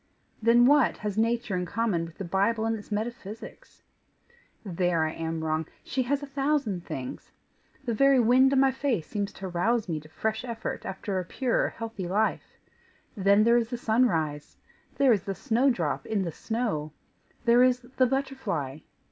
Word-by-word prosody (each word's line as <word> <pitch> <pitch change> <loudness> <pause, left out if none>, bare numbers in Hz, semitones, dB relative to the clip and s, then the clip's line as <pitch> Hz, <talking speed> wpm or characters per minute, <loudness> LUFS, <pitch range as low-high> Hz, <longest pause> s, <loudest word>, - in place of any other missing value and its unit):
Then, 235 +2 +5
what 290 0 +4
has 210 -2 -4
nature 230 -2 0
in 180 -1 -2
common 205 -5 0
with 165 0 -12
the 195 - -5
Bible 205 +5 +1
and 225 0 +1
its 215 0 -10
metaphysics? 215 0 -6 0.8
There 175 -3 +1
I 155 - -2
am 160 0 -4
wrong 155 0 -1 0.2
she 260 - -1
has 280 +3 -1
a - - -3
thousand 275 - -1
things. 130 -1 -6 0.6
The 235 - 0
very 275 +3 +5
wind 250 +3 +5
on 275 - +3
my 270 0 +5
face 260 - -1
seems 205 +2 -3
to 190 - -7
rouse 205 +6 0
me 160 -3 -2
to 155 0 -15
fresh 220 +7 -2
effort 230 -3 -5
after 195 0 -3
a - - -2
pure 245 +7 0
healthy 225 -5 -6
life! 210 +4 -1 0.6
Then 200 0 +4
there 235 +1 +5
is 230 -1 0
the 245 - -3
sunrise! 170 -12 0 0.4
There 270 -2 +5
is 205 - 0
the 195 - -3
snowdrop 235 - 0
in 205 -3 0
the 170 - -3
snow! 180 -8 -3 0.5
There 235 +1 +6
is 250 0 +4
the 255 +1 +1
butterfly! 235 - -2
220 Hz, 175 wpm, -27 LUFS, 180-245 Hz, 0.8 s, There